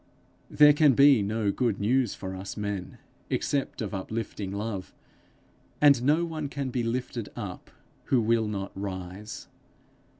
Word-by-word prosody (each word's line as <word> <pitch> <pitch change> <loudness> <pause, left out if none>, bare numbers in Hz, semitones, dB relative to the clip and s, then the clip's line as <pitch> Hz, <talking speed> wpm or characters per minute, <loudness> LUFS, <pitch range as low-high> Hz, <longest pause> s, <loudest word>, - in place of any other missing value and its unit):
There 150 0 +7
can 150 -2 +5
be 140 -3 +6
no 105 0 0
good 115 -3 0
news 120 +2 +1
for 95 0 -6
us 95 +3 -7
men, 100 -3 -4 0.3
except 140 -4 -1
of 105 - -5
uplifting 105 0 -4
love, 100 -2 -4 0.9
and 140 -4 +6
no 150 +6 +3
one 155 -3 -4
can 140 -2 -4
be 125 - -1
lifted 120 -1 -3
up 100 -6 -7 0.4
who 130 - +3
will 115 0 +2
not 100 -2 -4
rise. 95 +1 -6
110 Hz, 140 wpm, -27 LUFS, 100-135 Hz, 0.9 s, There